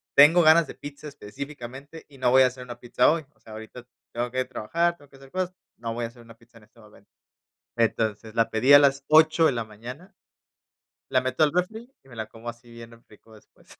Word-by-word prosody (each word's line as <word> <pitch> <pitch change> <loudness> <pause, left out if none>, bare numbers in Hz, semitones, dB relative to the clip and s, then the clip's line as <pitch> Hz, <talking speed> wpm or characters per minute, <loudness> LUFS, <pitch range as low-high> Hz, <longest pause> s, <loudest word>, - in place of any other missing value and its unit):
tengo 160 +5 +7
ganas 160 +1 +6
de - - -10
pizza 145 +1 -10
específicamente 140 +3 -10
y 140 -3 -18
no 125 -1 +2
voy 130 +1 +6
a - - +5
hacer 125 0 -8
una 120 -1 -10
pizza 125 +1 +2
hoy, 160 -3 -2
o - - -35
sea, 110 - -14
ahorita 110 +3 -10 0.3
tengo 120 +1 -2
que 130 - -8
ir - - -3
a - - -28
trabajar, 170 +9 -1
tengo 145 -1 -20
que 135 - -18
hacer 135 0 -17
cosas, 185 0 -3 0.2
no 115 0 -5
voy 120 -1 -3
a - - -6
hacer 120 0 -18
una 115 0 -16
pizza 115 0 -21
en 105 - -21
este 115 - -26
momento. 105 -2 -20 0.7
Entonces, 110 -1 -1
la 115 0 +1
pedí 130 +6 +4
a - - +11
las 140 -1 +3
8 160 +1 +5
de - - +3
la 115 -2 -3
mañana, 125 - -11 1.0
la 130 -1 +3
meto 130 +4 0
al 150 - +3
refri 220 +8 -3
y - - -23
me 120 - -14
la 110 -1 -5
como 115 +1 -14
así 120 0 -9
bien 115 0 -13
rico 110 +1 -19
después. 105 - -23
125 Hz, 240 wpm, -25 LUFS, 115-145 Hz, 1.0 s, a